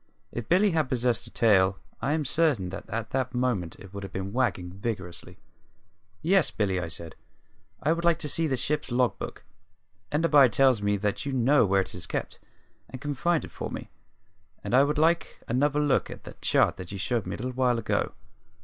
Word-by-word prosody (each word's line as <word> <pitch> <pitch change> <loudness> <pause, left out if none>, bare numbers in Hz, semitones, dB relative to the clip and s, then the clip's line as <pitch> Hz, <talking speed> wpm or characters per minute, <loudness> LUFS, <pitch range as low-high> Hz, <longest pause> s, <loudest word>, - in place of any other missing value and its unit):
If 120 -2 -6
Billy 190 +3 +4
had 155 -5 0
possessed 120 -2 0
a - - -8
tail 95 -4 +3 0.2
I 140 - 0
am 155 -2 -1
certain 140 - +1
that 95 +2 -8
at 110 0 -4
that 130 -1 -1
moment 120 -10 -1
it 95 0 -13
would 100 - -6
have 100 - -7
been 95 +1 -5
wagging 110 -9 0
vigorously. 95 -3 -5 0.9
"Yes, 190 0 +4
Billy," 95 -4 0
I 85 - -3
said. 80 0 -6 0.7
"I 155 +4 +3
should 170 0 -4
like 170 -2 +4
to - - -3
see 165 +3 +1
the 135 -3 0
ship's 145 +3 -1
log 125 0 +1
book. - - -7 0.7
Enderby 150 -4 +5
tells 130 0 +4
me 100 0 +1
that 105 +7 -2
you 140 - -2
know 130 -1 +4
where 95 0 +3
it - - -6
is 90 0 -6
kept, - - -4 0.5
and 130 - -8
can 145 +2 -3
find 170 +4 +1
it - - -13
for - - -5
me. - - -7 0.7
And - - -4
I 135 +2 +7
should 150 +1 -1
like 165 +2 +2
another 145 +4 +1
look 145 -2 +2
at - - -9
the - - -9
chart - - +3
that 90 0 -8
you 100 - -5
showed 110 +1 -1
me 95 - -3
a - - -8
little 125 +3 -3
while 125 -1 +2
ago. 115 - -1
125 Hz, 210 wpm, -27 LUFS, 100-145 Hz, 0.9 s, I